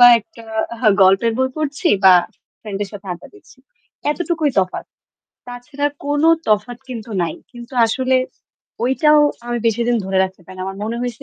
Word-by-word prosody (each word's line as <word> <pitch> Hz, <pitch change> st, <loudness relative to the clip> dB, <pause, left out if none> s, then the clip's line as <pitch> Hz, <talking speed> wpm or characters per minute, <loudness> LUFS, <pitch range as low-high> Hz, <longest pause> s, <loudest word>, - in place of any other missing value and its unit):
বা 245 Hz, -, +10 dB
একটা 225 Hz, +2 st, -16 dB, 0.6 s
গল্পের 195 Hz, +5 st, +4 dB
বই 260 Hz, 0 st, +2 dB
পড়ছি 305 Hz, +3 st, -1 dB, 0.2 s
বা 185 Hz, -1 st, +9 dB, 0.5 s
ফ্রেন্ড 205 Hz, -3 st, -6 dB
এর 200 Hz, -, -4 dB
সাথে 200 Hz, -1 st, -10 dB
আড্ডা 175 Hz, -, -10 dB
দিচ্ছি। 405 Hz, -, -19 dB, 0.5 s
এতটুকুই 330 Hz, -2 st, 0 dB
তফাৎ। 185 Hz, -1 st, -4 dB, 0.6 s
তাছাড়া 275 Hz, +4 st, -4 dB, 0.2 s
কোন 290 Hz, +1 st, 0 dB, 0.3 s
তফাৎ 215 Hz, +3 st, +1 dB
কিন্তু 230 Hz, -2 st, -7 dB
নাই। 165 Hz, -2 st, -2 dB, 0.2 s
কিন্তু 240 Hz, +1 st, -11 dB
আসলে 260 Hz, +3 st, +1 dB, 0.7 s
ঐটাও 300 Hz, +4 st, +4 dB, 0.3 s
আমি 240 Hz, 0 st, -2 dB
বেশিদিন 235 Hz, +2 st, +1 dB
ধরে 190 Hz, 0 st, 0 dB
রাখতে 190 Hz, 0 st, -8 dB
পারি 185 Hz, +1 st, -12 dB
না। 185 Hz, -, -5 dB
আমার 195 Hz, 0 st, -5 dB
মনে 230 Hz, +2 st, -3 dB
হইছে 245 Hz, -2 st, -5 dB
240 Hz, 160 wpm, -19 LUFS, 200-270 Hz, 0.7 s, বা